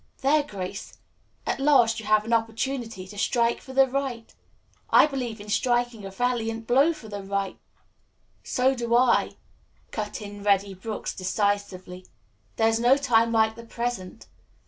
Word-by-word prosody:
"There, 295 +3 +4
Grace. 200 -7 -7 0.5
At - - -1
last 255 -6 +4
you 220 - -8
have 215 0 +3
an 230 - -1
opportunity 225 -3 -2
to 205 +1 -9
strike 235 +1 +1
for 265 - -11
the 270 +1 +5
right. 260 -3 -4 0.6
I - - +7
believe 250 -6 -4
in 205 - -10
striking 240 0 0
a - - -5
valiant 225 +1 -2
blow 275 +8 +4
for 280 -9 -10
the 205 -1 -6
right 195 0 -3 0.5
" - - -41
"So 260 +1 +3
do 235 -2 -1
I," 250 +1 +3 0.6
cut 210 -2 -4
in 205 -1 -9
Reddy 200 -1 +2
Brooks 210 +4 -5
decisively. 185 -1 -2 0.5
"There 225 - +3
is 225 0 +2
no 245 +3 +5
time 230 -5 +3
like 220 -1 +3
the 235 - -10
present. 230 -4 -5
225 Hz, 160 wpm, -25 LUFS, 205-245 Hz, 0.6 s, I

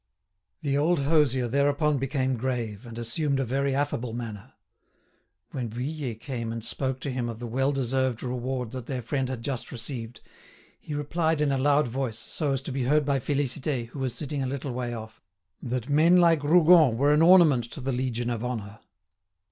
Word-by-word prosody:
The 140 -1 +1
old 160 +1 +2
hosier 140 -4 +2
thereupon 145 +3 +2
became 130 -1 0
grave, 120 -3 -3
and 115 -1 -9
assumed 135 +5 -1
a 135 - 0
very 135 +2 0
affable 130 -5 -1
manner. 110 -4 -7 1.0
When 125 -4 -3
Vuillet 125 0 -4
came 120 -4 -4
and 115 -1 -5
spoke 130 -1 -2
to 140 - -3
him 125 -2 -2
of 115 - -6
the 120 - -6
well 135 +4 0
deserved 130 -2 0
reward 125 -1 -3
that 130 -3 -7
their 130 -3 -3
friend 130 +1 -1
had 125 -3 -5
just 130 -3 -4
received, 120 -1 -6 0.6
he 150 - -6
replied 160 +2 0
in 150 -2 +2
a 135 - +1
loud 145 +1 +3
voice, 120 -2 -3
so 145 +5 -3
as 135 -1 -1
to 140 - -5
be 130 -1 -1
heard 150 +3 +3
by 140 -1 +1
Félicité, 135 -2 -1
who 135 - -9
was 130 -3 -2
sitting 145 -2 -3
a 130 - -1
little 135 +1 -4
way 120 0 -3
off, 110 -1 -8 0.4
that 125 -1 -3
"men 160 +5 +5
like 165 -4 +4
Rougon 160 -5 +6
were 145 +3 +4
an 150 - +4
ornament 165 -8 +6
to 120 - -8
the 135 0 -2
Legion 120 -1 -1
of 115 -1 -3
Honour." 110 -3 -5
130 Hz, 190 wpm, -27 LUFS, 120-145 Hz, 1.0 s, Rougon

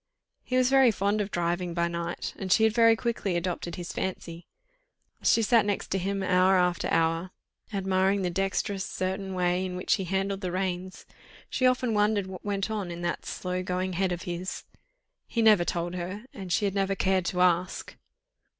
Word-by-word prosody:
He 255 - -1
was 255 0 +3
very 270 -2 +6
fond 205 0 0
of 200 - -3
driving 175 -1 -1
by 170 -1 +1
night, 170 0 -4
and 190 -2 -4
she 220 - +5
had 220 -1 +4
very 230 -1 +6
quickly 225 -5 -2
adopted 175 -1 -3
his 175 -1 -6
fancy: 170 -2 -5 0.7
as - - +4
she 230 - +3
sat 230 0 +4
next 205 -1 -2
to 195 - +1
him 195 +1 -2
hour 185 +1 +4
after 180 -1 +1
hour, 165 +2 +1 0.4
admiring 195 0 +1
the 180 - 0
dexterous, 195 +1 -1
certain 190 +1 -3
way 180 0 +1
in 185 -1 -4
which 180 - +1
he 190 - -3
handled 195 +2 -1
the 180 -2 -3
reins, 185 0 -3 0.5
she 255 - +3
often 250 -2 +1
wondered 210 -1 +2
what 190 -1 -9
went 200 0 -2
on 205 -4 -3
in 170 0 -6
that 175 0 -3
slow 180 0 -3
going 185 0 -2
head 185 +1 0
of 175 0 -3
his. 175 +1 -4 0.6
He 230 - 0
never 210 -5 +6
told 175 0 -2
her, 185 +5 -5
and 190 -3 -7
she 205 - +2
had 195 - 0
never 195 0 0
cared 190 -2 +1
to 180 0 -1
ask. 180 0 +1
190 Hz, 195 wpm, -27 LUFS, 180-200 Hz, 0.7 s, very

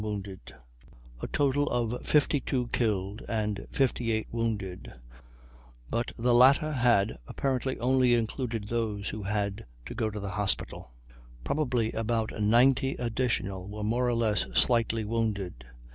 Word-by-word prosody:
1 105 -2 -3 1.0
A - - -3
total 145 0 +1
of 120 0 -1
52 140 -4 +1
killed 105 -3 -1
and 105 -3 -2
58 115 -4 0
wounded; 110 -6 -3 1.0
but 120 +1 -1
the 120 +1 +2
latter 135 +5 +6
head 120 - +2
apparently 130 -1 -2
only 125 0 +3
included 115 -1 -2
those 110 -3 -2
who 110 - -5
had 100 - -2 0.2
to - - -6
go 110 - -1
to 105 0 -6
the 100 -1 -4
hospital. 100 - -2 0.5
Probably 125 - 0
about 115 0 -1
90 125 +5 +3
additional 115 -6 -2
were 105 +1 -6
more 120 +4 +1
or 120 - +1
less 110 -3 +1
slightly 115 -2 +2
wounded. 105 - -2
115 Hz, 130 wpm, -28 LUFS, 105-125 Hz, 1.0 s, latter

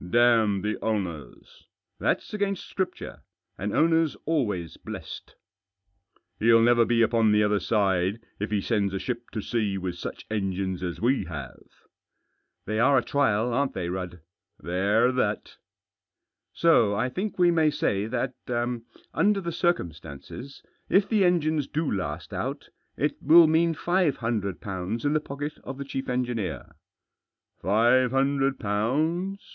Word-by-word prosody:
" 90 - -9
Damn 110 -5 +4
the 105 0 -2
owners! 95 -9 -5
" - - -32
"Thafs - - -1
against 200 -2 -2
Scripture. 190 -2 -4 0.4
An 100 +2 -2
owner's 165 +1 +2
always 105 - -1
blessed." - - -9 0.5
" 100 0 -43
He'll 115 +1 +5
never 120 0 +5
be 115 0 +3
upon 115 -1 +3
the 105 0 +4
other 105 -1 +2
side 95 0 +1 0.2
if 105 - -2
he 105 -2 0
sends 100 -3 0
a - - -2
ship 120 +1 -5
to 110 - -4
sea 105 -5 -1
with 90 -2 -4
such - - -7
engines 95 -3 -2
as 90 -2 -4
we 130 +4 +1
have." 70 -6 -8 0.5
" - - -50
They 110 +1 -2
are 135 +3 +5
a 125 - +2
trial, 120 -4 +1
aren't 140 +3 0
they, 85 -2 -3
Rudd? 90 -2 -5
" 95 - -64
" 100 +2 -51
They're 100 +7 +2
that." 110 -5 -2 0.9
"So 115 -12 +3
I 110 +5 0
think 190 +11 -4
we 175 -1 +5
may 160 -2 +3
say 105 -8 -1
that, 125 +2 -2 0.8
under 200 +4 +2
the 170 -3 -4
circum 175 - 0
stances, 80 - -10 0.3
if 195 +1 +4
the 215 -3 +2
engines 155 -5 +2
do 155 0 -2
last 95 -3 -4
out, - - -4 0.3
it 150 +4 0
will 165 +3 +8
mean 165 +1 +2
five 175 -3 +1
hundred 105 -6 -2
pounds 100 +5 -4
in 145 - +2
the 155 - +3
pocket 145 +1 -6
of 135 - -7
the 140 - -5
chief 135 -1 -5
engineer." 120 -5 -2 0.4
" - - -50
Five 120 +7 +3
hundred 135 +1 +1
pounds 155 - -1
115 Hz, 160 wpm, -26 LUFS, 100-150 Hz, 0.9 s, will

